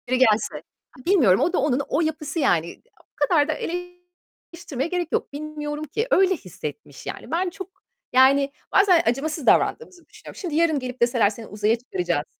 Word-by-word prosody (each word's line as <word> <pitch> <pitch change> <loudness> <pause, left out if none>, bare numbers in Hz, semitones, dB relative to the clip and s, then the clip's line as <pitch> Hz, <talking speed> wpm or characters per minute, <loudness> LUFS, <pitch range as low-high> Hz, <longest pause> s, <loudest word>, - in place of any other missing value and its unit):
Biri 255 +1 +1
gelse. 220 -4 +2 0.4
İ - - -22
bilmiyorum 265 - +4
o 350 - +1
da - - +2
onun, 275 -1 +1
o 295 - +1
yapısı 315 0 -2
yani. 170 - +2
İ - - -17 0.2
o - - -40
kadar 295 -2 +3
da 310 - 0
eleştirmeye 355 -4 -7
gerek 355 -1 -1
yok. - - -2
Bilmiyorum 300 0 -5
ki. 440 - -3
Öyle 380 0 +4
hissetmiş 150 - -9
yani. - - -7
Ben 355 +3 0
çok 380 +1 -9 0.4
yani 275 +2 +5 0.2
bazen 375 -4 +5
acımasız 290 +4 -1
davrandığımızı 370 - +1
düşünüyorum. - - -13
Şimdi 345 -6 -4
yarın 320 -2 +2
gelip 255 -1 -7
deseler 240 -3 +3
"Seni 220 +1 -9
uzaya 210 +2 +1
çıkaracağız." 355 - -2
300 Hz, 175 wpm, -23 LUFS, 250-350 Hz, 0.4 s, yani